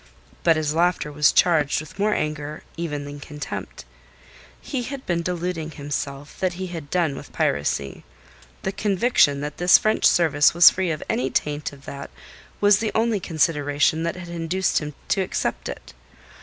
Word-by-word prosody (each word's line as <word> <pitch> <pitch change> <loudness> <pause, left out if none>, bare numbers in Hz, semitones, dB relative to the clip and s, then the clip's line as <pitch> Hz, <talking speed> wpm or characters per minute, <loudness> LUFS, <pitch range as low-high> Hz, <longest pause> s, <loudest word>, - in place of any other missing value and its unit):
But 165 -1 +4
his 155 -1 -1
laughter 170 -2 +1
was 150 0 +4
charged 155 -5 +3
with 155 +5 -11
more 210 +1 +2
anger 150 0 -3
even 150 -4 -4
than 145 0 -8
contempt. 145 - -7 0.7
He 265 - -4
had 270 +2 -6
been 170 -1 0
deluding 175 -2 -3
himself 145 -1 -5
that 185 -1 0
he 185 +2 -5
had 155 -4 -7
done 170 -5 +1
with - - -10
piracy. 70 -1 -1 0.6
The 190 - -1
conviction 195 - +2
that 150 0 -5
this 175 0 +7
French 215 0 +1
service 155 -3 +4
was 175 0 +9
free 185 -1 -1
of 155 -2 -3
any 130 +2 0
taint 150 +2 -2
of 140 -1 -15
that 140 0 -7 0.5
was 205 0 +5
the 220 -1 -1
only 225 -1 +2
consideration 155 -2 +1
that 170 +2 -2
had 180 -1 -9
induced 170 +2 0
him 150 -2 -7
to 195 - +2
accept 185 - -2
it. - - -9
160 Hz, 170 wpm, -23 LUFS, 145-180 Hz, 0.7 s, was